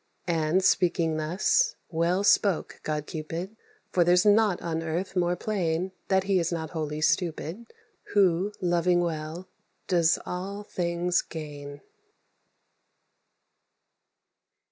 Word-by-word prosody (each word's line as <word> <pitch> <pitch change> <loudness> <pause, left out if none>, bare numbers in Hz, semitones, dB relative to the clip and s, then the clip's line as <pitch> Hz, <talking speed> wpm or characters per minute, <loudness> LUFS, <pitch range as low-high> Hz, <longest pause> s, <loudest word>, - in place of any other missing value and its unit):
And, 165 +1 +1
speaking 170 -4 +2
thus, 185 - +1 0.2
well 170 +4 +1
spoke 200 -3 +2
god 150 -1 -3
Cupid; 165 +7 -5 0.4
For 180 - +4
there's 180 +2 +4
nought 210 -2 +4
on 165 -1 -3
earth 170 +4 -3
more 175 -1 +1
plain 180 -2 -1 0.2
That 190 -1 +2
he 195 -1 +2
is 170 0 -1
not 160 -2 -3
wholly 155 -2 -3
stupid 175 +6 -1 0.4
Who, 195 -1 +3
loving 175 -1 +2
well, 165 +1 -4 0.4
does 170 -3 +3
all 195 +3 -5
things 175 -2 0
gain. 145 -2 -8
175 Hz, 110 wpm, -27 LUFS, 160-190 Hz, 0.4 s, For